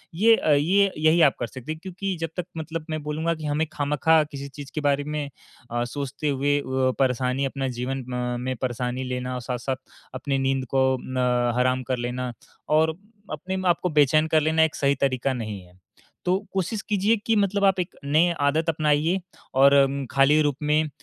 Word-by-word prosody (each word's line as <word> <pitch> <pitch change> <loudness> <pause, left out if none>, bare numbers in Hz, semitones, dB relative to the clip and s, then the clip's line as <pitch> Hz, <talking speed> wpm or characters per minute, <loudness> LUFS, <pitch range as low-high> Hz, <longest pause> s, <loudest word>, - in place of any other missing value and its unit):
ये 225 +6 +6
अ, 155 - 0
ये 185 +8 +3
यही 155 +2 +4
आप 145 -4 +5
कर 120 - -2
सकते 130 +5 -8
हैं, 155 - -5
क्योंकि 190 +1 -4
जब 165 - -1
तक 180 - -2
मतलब 160 0 -5
मैं 155 -1 -3
बोलूँगा 155 +3 -1
कि 155 -1 -8
हमें 150 +2 0
खामखा 150 +2 +3
किसी 140 0 -6
चीज़ 140 0 -10
के 155 - -1
बारे 145 -1 +1
में 150 -1 -4 0.4
अ, 120 0 0
सोचते 140 +3 -4
हुए 145 +1 +1
अ, - - -6 0.4
परेशानी 130 +1 +1
अपना 135 0 -2
जीवन 130 +1 -3
अ, 125 0 -3
में 130 +1 -2
परेशानी 125 0 -2
लेना 125 0 -3
और 125 - -4
साथ-साथ 125 +2 -3 0.4
अपनी 135 +1 -2
नींद 135 0 0
को 130 0 +4
अ, 125 -2 0
हराम 130 0 +1
कर 130 - +1
लेना 125 +1 -3 0.4
और 160 +1 +3 0.4
अपने 185 +5 -4
आप 170 - +3
को 180 - +1
बेचैन 155 0 +4
कर 160 -1 +3
लेना 160 +1 +3
एक 160 -1 0
सही 140 0 +2
तरीका 135 -1 +1
नहीं 110 -5 -5
है। 90 0 -20 0.5
तो 180 +1 +3 0.2
कोशिश 195 +3 -1
कीजिए 210 +2 +3
कि 225 - +2
मतलब 200 -1 +1
आप 190 -1 +3
एक 180 0 -3
नए 155 +5 +3
आदत 150 +3 +2
अपनाइए 155 +3 +1 0.3
और 135 +1 +6
अम, 140 0 +3
खाली 135 +3 +4
रूप 145 -2 +1
में। 150 +1 +2
145 Hz, 195 wpm, -24 LUFS, 130-160 Hz, 0.5 s, ये